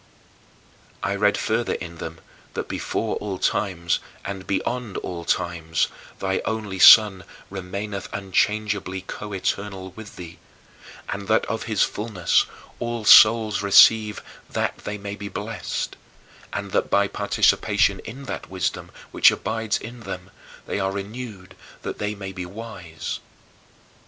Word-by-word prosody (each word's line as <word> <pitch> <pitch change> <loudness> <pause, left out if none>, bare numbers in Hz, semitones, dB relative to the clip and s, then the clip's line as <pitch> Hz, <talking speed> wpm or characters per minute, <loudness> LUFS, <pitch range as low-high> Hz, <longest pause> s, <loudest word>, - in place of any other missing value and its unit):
I 100 - 0
read 105 0 +3
further 115 +2 0
in 85 -1 -7
them 80 0 -7 0.3
that - - -3
before - - -2
all 100 -3 -4
times 85 -4 0 0.3
and 95 -1 -5
beyond 120 +1 -2
all 85 -2 -5
times, 85 -2 0 0.3
thy 95 -1 -1
only 105 -4 -3
Son 105 -2 +9 0.3
remaineth 100 +1 -5
unchangeably 100 0 0
coeternal 100 -1 -4
with 110 +2 -11
thee, 85 -1 -10 0.7
and 100 0 -4
that 110 0 +3
of 115 - -3
his 105 -3 +3
fullness 105 -6 +1 0.3
all 120 -2 -3
souls 110 -1 +7
receive 105 +2 +6 0.3
that - - -1
they 105 0 -5
may 100 0 -6
be 100 0 -7
blessed, 105 +3 -4 0.6
and - - -4
that - - +1
by 100 0 +3
participation 100 0 +2
in 130 +5 -9
that 135 - -6
wisdom 95 0 -2 0.2
which - - +7
abides 110 +1 -1
in 120 +2 -9
them, 95 -3 -7 0.3
they - - -2
are 95 0 0
renewed 100 -1 -7 0.3
that - - -5
they 105 0 -2
may 95 -1 -6
be 90 -1 -6
wise. 95 -5 -6
100 Hz, 130 wpm, -24 LUFS, 95-110 Hz, 0.7 s, Son